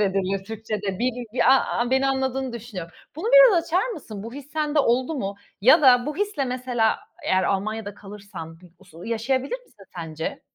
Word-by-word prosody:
edilir 195 -1 0
Türkçede. 210 -3 -4
Bir 245 -1 -2
a 270 - +2
a 240 +1 0
beni 265 +1 +3
anladığını 265 -1 -1
düşünüyorum. 210 -8 -7 0.2
Bunu 345 +8 -4
biraz - - +7
açar 365 +8 +1
mısın 230 - -7
bu 230 - -8
his 285 +1 -10
sende 305 -1 0
oldu 255 +3 +2
mu? 200 -7 -3 0.3
Ya 250 +7 +6
da 250 -2 +6
bu 300 - -3
hisle 410 -8 -1
mesela 250 -3 0 0.3
eğer 185 0 +2
Almanya'da 205 +1 -2
kalırsan 195 -6 -10 0.2
usu 175 -3 -14
yaşayabilir 260 - -1
misin 200 - -19
sence? 160 -2 -5
235 Hz, 165 wpm, -24 LUFS, 200-270 Hz, 0.3 s, biraz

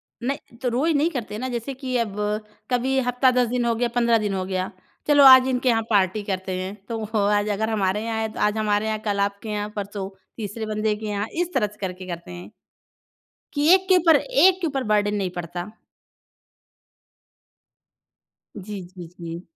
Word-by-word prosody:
न 250 +4 -4 0.3
तो 250 - +1
रोज़ 275 +8 +1
नहीं 315 +4 +2
करते 235 -7 -5
हैं 215 - -5
ना। 260 - -3
जैसे 245 +2 -4
कि 255 -1 -3
अब 215 -4 -2 0.5
कभी 260 +2 +1
हफ़्ता, 250 +1 +2
10 250 -2 +2
दिन 245 0 0
हो 235 -1 +2
गया, 240 +1 0
15 235 -1 +4
दिन 210 -2 -2
हो 185 -1 -2
गया, 185 0 -2 0.4
"चलो, 290 -1 +6
आज 260 -1 +9
इनके 255 0 +1
यहाँ 225 -2 +3
पार्टी 200 0 +2
करते 190 0 -3
हैं।" 190 +2 -5
तो 225 -2 -3 0.3
आज 205 +1 -1
अगर 220 0 0
हमारे 205 0 0
यहाँ 225 -1 -2
है, 220 - -1
तो - - -7
आज 210 +1 +2
हमारे 210 0 +1
यहाँ, 220 0 -1
कल 200 -1 0
आपके 200 +2 -2
यहाँ, 210 -1 -2
परसों 200 -1 -4 0.3
तीसरे 220 0 -5
बंदे 215 0 0
के 215 0 -7
यहाँ, 205 0 -2 0.2
इस 355 - -5
तरह 225 -5 +2
से 210 +1 -15
करके 185 0 -7
करते 170 -1 -7
हैं 175 0 -8 1.1
कि 290 +1 +1
एक 380 0 +3
के 375 - +7
ऊपर 325 -2 +5
एक 380 - +4
के 335 - +1
ऊपर 270 -3 -2
बर्डन 210 0 +2
नहीं 195 -2 -1
पड़ता। 175 +2 -5 2.9
जी, 200 0 -6
जी, 175 -1 -11
जी। 170 0 -6
220 Hz, 195 wpm, -23 LUFS, 200-255 Hz, 2.9 s, आज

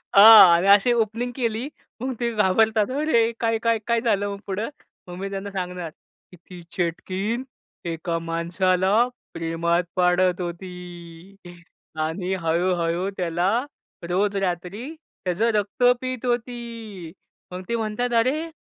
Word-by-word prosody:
हां. 200 -4 +10
आणि 180 +3 +1
अशी 200 +4 +6
ओपनिंग 230 +2 -1
केली 235 0 -2 0.3
मग 260 0 -2
ते 235 -1 0
घाबरतात 215 +3 +2
अरे 235 -7 +2
काय-काय, 230 0 +1
काय 235 -1 +2
झालं 205 -4 0
मग 200 - -8
पुढं. 205 +5 -3 0.4
मग 175 - -8
मी 195 0 -4
त्यांना 200 +1 -5
सांगणार, 180 -3 -4 0.4
की 180 - -14
ती 175 +1 -13
चेटकीण 190 +7 -2 0.5
एका 165 +1 -3
माणसाला 185 +6 +1 0.3
प्रेमात 170 +1 0
पाडत 180 0 +2
होती 175 0 -9 0.6
आणि 180 +4 -2
हळू-हळू 170 +2 0
त्याला 175 +1 0 0.6
रोज 200 +3 +1
रात्री 195 - -3 0.3
त्याचं 190 +6 +1
रक्त 210 +4 -1 0.2
पित 255 -1 -4
होती. 230 -7 -4 0.4
मग 180 - -6
ते 235 - 0
म्हणतात 230 +2 -2
"अरे! 305 +8 0
195 Hz, 125 wpm, -23 LUFS, 175-230 Hz, 0.6 s, हां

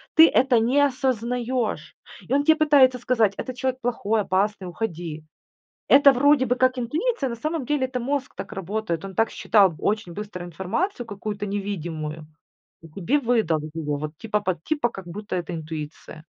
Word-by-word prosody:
ты 320 +1 +9
это 250 -3 +3
не 255 +6 +3
осознаешь. 245 - -1 0.3
И - - -12
он 285 +1 +3
тебе 315 +1 +5
пытается 275 -5 +5
сказать, 225 -5 +2
этот 255 - -5
человек 260 0 -1
плохой, 225 -3 0
опасный, 195 +1 0
уходи. 170 -5 -5 0.7
Это 280 0 +8
вроде 280 +1 +4
бы 250 - +2
как 255 0 +2
интуиция, 295 - -1
на - - -3
самом 310 +3 -3
деле 280 -1 0
это 255 -1 -4
мозг 275 +2 -2
так - - -7
работает. 195 -2 -3
Он 195 - -7
так 225 +3 +2
считал 195 -6 +3
очень 210 -4 -1
быстро 200 -2 -6
информацию 225 - -3
какую-то 205 0 -5
невидимую, 165 -6 -4 0.6
и 165 - -12
тебе 195 - 0
выдал 225 - +1
вот 155 0 -7
его, 150 -3 -2
вот 150 +1 -6
типа 210 -1 -1
под 185 -5 -2
типа 295 -6 0
как 195 -4 -10
будто 205 +4 -6
это 175 0 -4
интуиция. 155 0 -7
220 Hz, 170 wpm, -24 LUFS, 180-260 Hz, 0.7 s, ты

